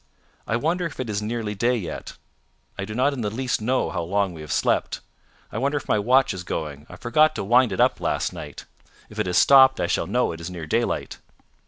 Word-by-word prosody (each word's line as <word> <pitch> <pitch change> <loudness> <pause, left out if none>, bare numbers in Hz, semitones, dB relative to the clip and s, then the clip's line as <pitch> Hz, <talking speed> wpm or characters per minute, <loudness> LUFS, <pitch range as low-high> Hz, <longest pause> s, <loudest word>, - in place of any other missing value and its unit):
"I 115 - 0
wonder 170 +8 0
if 150 - -12
it 125 -4 -3
is 105 0 -2
nearly 110 -1 -3
day 120 +5 +1
yet. 90 -7 -7 0.6
I 100 - -4
do 105 +1 -7
not 135 +4 +2
in 130 - -4
the 105 - -1
least 125 +2 -2
know 130 +4 0
how 90 - -2
long 95 +2 0
we 80 - -9
have 75 - -8
slept. - - 0 0.5
I 110 - -3
wonder 140 +3 0
if 140 - -6
my 105 - +2
watch 130 +6 +3
is 90 -1 -6
going. 75 -4 -5
I - - -10
forgot 155 +6 +2
to - - -3
wind 120 +3 +4
it 95 - -4
up - - +3
last - - -1
night. 75 -2 -9 0.4
If - - -9
it - - 0
has 90 +1 +1
stopped 130 -1 +7
I - - +1
shall - - -1
know 125 0 +1
it 85 0 -8
is 85 - -5
near 85 -3 -7
daylight." 115 +9 -1
110 Hz, 235 wpm, -24 LUFS, 95-130 Hz, 0.6 s, stopped